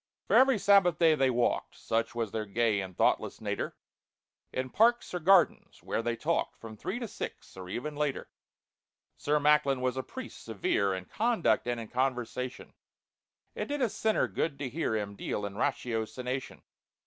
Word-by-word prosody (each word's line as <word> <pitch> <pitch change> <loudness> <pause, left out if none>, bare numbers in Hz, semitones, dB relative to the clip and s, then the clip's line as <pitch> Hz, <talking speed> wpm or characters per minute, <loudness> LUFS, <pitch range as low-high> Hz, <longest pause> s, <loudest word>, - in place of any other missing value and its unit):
For - - +2
every 265 -2 +6
Sabbath 195 -5 +5
day 165 -2 +5
they 135 -3 +3
walked 120 -1 0
(Such 115 +1 -1
was 115 -3 -2
their 110 -1 -3
gay 105 0 +1
and 95 -2 -8
thoughtless - - +1
natur) - - -3 0.8
In 130 0 -3
parks 235 0 +3
or 180 - -1
gardens, 180 +1 +3
where - - -1
they 120 0 -1
talked 160 +8 -1
From 110 -1 -10
three 185 - -4
to 240 -2 -4
six, - - -7
or 90 -1 -8
even 145 +9 -4
later. 145 -2 -2 0.9
SIR 150 +1 +1
MACKLIN 145 -2 +4
was 130 0 -1
a - - 0
priest 260 - -9
severe 100 -3 0
In 95 0 -6
conduct 225 - +1
and 120 -1 -1
in 115 - -6
conversation, 125 -1 -2 0.8
It - - -3
did 290 -2 -1
a 240 - +2
sinner 220 +2 +1
good 150 -4 -2
to 140 -2 -4
hear 135 -4 -1
Him 100 -2 -3
deal 105 - -3
in 100 - -5
ratiocination. 125 +3 -3
130 Hz, 170 wpm, -30 LUFS, 115-170 Hz, 0.9 s, every